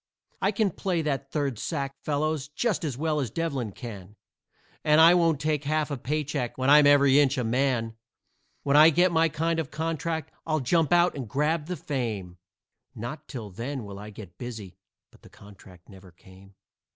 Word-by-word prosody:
I 195 Hz, -, +2 dB
can 205 Hz, -1 st, +1 dB
play 175 Hz, -1 st, -2 dB
that 140 Hz, -2 st, -3 dB
third 140 Hz, -7 st, -2 dB
sack, 140 Hz, -4 st, -3 dB
fellows, 150 Hz, -1 st, -1 dB
just 200 Hz, +7 st, -1 dB
as 140 Hz, -6 st, -3 dB
well 155 Hz, 0 st, 0 dB
as 130 Hz, -5 st, -2 dB
Devlin 140 Hz, -6 st, -3 dB
can, 105 Hz, -3 st, -9 dB, 0.7 s
And 150 Hz, 0 st, +4 dB
I 165 Hz, +2 st, +8 dB
won't 165 Hz, -4 st, +2 dB
take 150 Hz, -1 st, -1 dB
half 155 Hz, +1 st, 0 dB
a 140 Hz, -, -2 dB
paycheck, 145 Hz, -2 st, -3 dB
when 130 Hz, +1 st, +2 dB
I'm 150 Hz, 0 st, +7 dB
every 140 Hz, -1 st, +5 dB
inch 140 Hz, -1 st, +3 dB
a 125 Hz, -, 0 dB
man. 115 Hz, -1 st, 0 dB, 0.7 s
When 140 Hz, 0 st, +1 dB
I 155 Hz, +2 st, +9 dB
get 175 Hz, +3 st, +3 dB
my 165 Hz, 0 st, +3 dB
kind 165 Hz, +2 st, -1 dB
of 155 Hz, -4 st, -3 dB
contract, 160 Hz, 0 st, -3 dB
I'll 155 Hz, -1 st, 0 dB
jump 155 Hz, +5 st, +1 dB
out 175 Hz, 0 st, +4 dB
and 130 Hz, -6 st, -6 dB
grab 150 Hz, +4 st, 0 dB
the 180 Hz, -1 st, -4 dB
fame, 110 Hz, -12 st, -4 dB, 0.6 s
Not 120 Hz, +8 st, -7 dB
till 110 Hz, -7 st, -7 dB
then 125 Hz, +6 st, -5 dB
will 100 Hz, -1 st, -9 dB
I 105 Hz, +1 st, -9 dB
get 100 Hz, -4 st, -12 dB
busy" 110 Hz, -7 st, -7 dB, 0.4 s
but -, -, -22 dB
the -, -, -16 dB
contract 95 Hz, -3 st, -16 dB
never 95 Hz, -2 st, -15 dB
came. 95 Hz, +3 st, -18 dB
145 Hz, 185 wpm, -26 LUFS, 115-160 Hz, 0.7 s, I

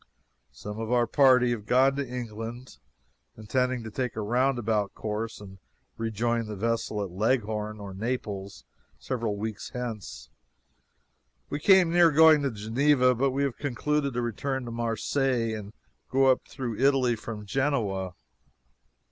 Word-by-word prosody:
Some 105 Hz, +1 st, -8 dB
of 115 Hz, +1 st, -4 dB
our 120 Hz, -1 st, +3 dB
party 125 Hz, -1 st, +4 dB
have 110 Hz, -3 st, -4 dB
gone 135 Hz, +2 st, +4 dB
to 140 Hz, -3 st, -3 dB
England, 120 Hz, -, -7 dB, 0.6 s
intending 125 Hz, +3 st, -1 dB
to 110 Hz, -, -7 dB
take 125 Hz, +2 st, -3 dB
a 110 Hz, -, -3 dB
roundabout 115 Hz, -3 st, 0 dB
course 110 Hz, +1 st, -4 dB
and 95 Hz, -1 st, -12 dB, 0.4 s
rejoin 115 Hz, +1 st, -1 dB
the 105 Hz, -, -5 dB
vessel 110 Hz, 0 st, -1 dB
at 95 Hz, -, -6 dB
Leghorn 110 Hz, +1 st, -1 dB
or 100 Hz, -1 st, -7 dB
Naples 100 Hz, -2 st, -4 dB, 0.3 s
several 115 Hz, -5 st, -3 dB
weeks 110 Hz, 0 st, -5 dB
hence. 120 Hz, -5 st, -6 dB, 1.2 s
We 145 Hz, -, -2 dB
came 185 Hz, 0 st, +5 dB
near 175 Hz, -1 st, +6 dB
going 155 Hz, 0 st, +7 dB
to 140 Hz, -, 0 dB
Geneva, 125 Hz, +4 st, +2 dB
but 135 Hz, +3 st, +1 dB
have 140 Hz, -3 st, 0 dB
concluded 145 Hz, 0 st, -1 dB
to 120 Hz, -, 0 dB
return 130 Hz, +3 st, -3 dB
to 120 Hz, -, -6 dB
Marseilles 115 Hz, +1 st, 0 dB
and 105 Hz, -1 st, -8 dB, 0.4 s
go 135 Hz, +1 st, +3 dB
up 130 Hz, -, -1 dB
through 120 Hz, -5 st, -5 dB
Italy 130 Hz, -3 st, +3 dB
from 110 Hz, -1 st, -7 dB
Genoa. 100 Hz, -8 st, -1 dB
120 Hz, 140 wpm, -27 LUFS, 110-130 Hz, 1.2 s, going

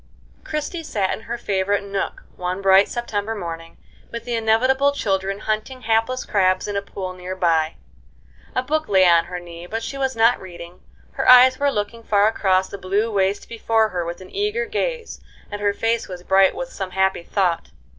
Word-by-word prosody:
Christie 305 Hz, +3 st, -4 dB
sat 205 Hz, -11 st, -1 dB
in -, -, -6 dB
her 235 Hz, +1 st, -4 dB
favorite 200 Hz, -1 st, 0 dB
nook 200 Hz, -1 st, -4 dB
one 180 Hz, +1 st, -3 dB
bright 195 Hz, 0 st, +5 dB
September 225 Hz, -2 st, -3 dB
morning, 165 Hz, -4 st, -7 dB, 0.3 s
with 235 Hz, 0 st, -7 dB
the 245 Hz, -, -3 dB
inevitable 255 Hz, +5 st, +3 dB
children 195 Hz, -5 st, -1 dB
hunting 215 Hz, +4 st, -3 dB
hapless 225 Hz, +3 st, 0 dB
crabs 185 Hz, -2 st, +1 dB
in 205 Hz, -, -4 dB
a 200 Hz, -, 0 dB
pool 190 Hz, -2 st, -6 dB
near 185 Hz, +1 st, -6 dB
by. 165 Hz, -3 st, +1 dB, 0.8 s
A 255 Hz, -, +1 dB
book 310 Hz, +4 st, -1 dB
lay 190 Hz, -2 st, +5 dB
on 170 Hz, -1 st, +5 dB
her 180 Hz, 0 st, -6 dB
knee, 170 Hz, 0 st, -10 dB
but 225 Hz, +4 st, -4 dB
she 275 Hz, -, -5 dB
was 265 Hz, -2 st, -1 dB
not 230 Hz, +2 st, +3 dB
reading; 175 Hz, -1 st, -10 dB, 0.3 s
her -, -, 0 dB
eyes 255 Hz, +1 st, +8 dB
were 285 Hz, 0 st, +3 dB
looking 210 Hz, +1 st, -3 dB
far 210 Hz, -2 st, +3 dB
across 190 Hz, -3 st, +2 dB
the 200 Hz, -, -8 dB
blue 200 Hz, +5 st, 0 dB
waste 195 Hz, 0 st, 0 dB
before 225 Hz, -1 st, +1 dB
her 180 Hz, -3 st, -2 dB
with 170 Hz, +2 st, -6 dB
an 185 Hz, -, -12 dB
eager 420 Hz, +4 st, -1 dB
gaze, 470 Hz, +1 st, -3 dB, 0.3 s
and 205 Hz, 0 st, -5 dB
her 205 Hz, 0 st, +2 dB
face 225 Hz, +3 st, -1 dB
was 180 Hz, -2 st, -8 dB
bright 190 Hz, 0 st, +4 dB
with 260 Hz, 0 st, -6 dB
some 190 Hz, -2 st, -4 dB
happy 190 Hz, 0 st, +1 dB
thought. 175 Hz, -1 st, -1 dB
205 Hz, 190 wpm, -22 LUFS, 185-235 Hz, 0.8 s, eyes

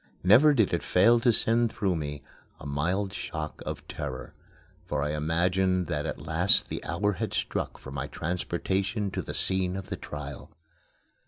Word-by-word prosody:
Never 120 Hz, +11 st, +7 dB
did 110 Hz, -8 st, +3 dB
it 85 Hz, -, +1 dB
fail 115 Hz, +6 st, +5 dB
to 120 Hz, +1 st, +4 dB
send 115 Hz, +1 st, +2 dB
through 95 Hz, -5 st, 0 dB
me 75 Hz, -2 st, -4 dB, 0.4 s
a -, -, -10 dB
mild 90 Hz, +8 st, -1 dB
shock 80 Hz, -4 st, -5 dB
of -, -, -5 dB
terror, 65 Hz, -3 st, -6 dB, 0.5 s
for 70 Hz, -, -2 dB
I 75 Hz, -, -1 dB
imagined 90 Hz, +4 st, +1 dB
that 75 Hz, -2 st, -2 dB
at -, -, -3 dB
last 80 Hz, +4 st, +3 dB
the -, -, -4 dB
hour 100 Hz, +5 st, 0 dB
had 90 Hz, -, -3 dB
struck -, -, -2 dB
for 65 Hz, -, -10 dB
my 70 Hz, +1 st, -3 dB
transportation 95 Hz, +5 st, -2 dB
to -, -, -2 dB
the -, -, -6 dB
scene 95 Hz, -1 st, +1 dB
of 95 Hz, -, -6 dB
trial. 75 Hz, -2 st, -7 dB
90 Hz, 165 wpm, -28 LUFS, 75-100 Hz, 0.5 s, Never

